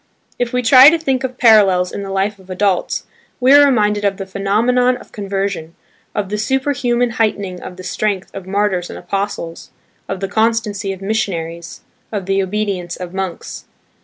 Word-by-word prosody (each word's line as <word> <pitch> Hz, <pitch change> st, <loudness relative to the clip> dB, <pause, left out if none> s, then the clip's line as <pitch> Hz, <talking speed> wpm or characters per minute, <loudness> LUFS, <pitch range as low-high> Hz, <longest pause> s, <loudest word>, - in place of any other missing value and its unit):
If 245 Hz, -1 st, -1 dB
we 250 Hz, 0 st, 0 dB
try 260 Hz, +4 st, +9 dB
to 335 Hz, -, +2 dB
think 270 Hz, -5 st, -1 dB
of 255 Hz, -1 st, -4 dB
parallels 195 Hz, -7 st, +5 dB
in -, -, -5 dB
the 195 Hz, -, -6 dB
life 195 Hz, +1 st, -1 dB
of 190 Hz, 0 st, -19 dB
adults, 185 Hz, 0 st, 0 dB, 0.3 s
we 260 Hz, +2 st, +5 dB
are 290 Hz, 0 st, +8 dB
reminded 210 Hz, -6 st, +2 dB
of 200 Hz, -1 st, +1 dB
the 195 Hz, -, -5 dB
phenomenon 230 Hz, +6 st, +1 dB
of -, -, -16 dB
conversion, 195 Hz, -5 st, -3 dB, 0.4 s
of 200 Hz, -2 st, -2 dB
the 210 Hz, +1 st, -2 dB
superhuman 245 Hz, 0 st, 0 dB
heightening 200 Hz, -4 st, -1 dB
of 180 Hz, -, -9 dB
the 185 Hz, -, -9 dB
strength 195 Hz, 0 st, -2 dB
of 195 Hz, -1 st, -8 dB
martyrs 195 Hz, -2 st, 0 dB
and -, -, -7 dB
apostles, 185 Hz, -3 st, -4 dB, 0.4 s
of 195 Hz, -, -3 dB
the 195 Hz, -, -2 dB
constancy 220 Hz, -2 st, 0 dB
of 190 Hz, 0 st, -8 dB
missionaries, 170 Hz, -6 st, -3 dB, 0.3 s
of 205 Hz, -4 st, -3 dB
the 195 Hz, +1 st, +1 dB
obedience 190 Hz, -3 st, -2 dB
of 180 Hz, -1 st, -8 dB
monks. 190 Hz, -3 st, -5 dB
200 Hz, 175 wpm, -17 LUFS, 190-230 Hz, 0.4 s, try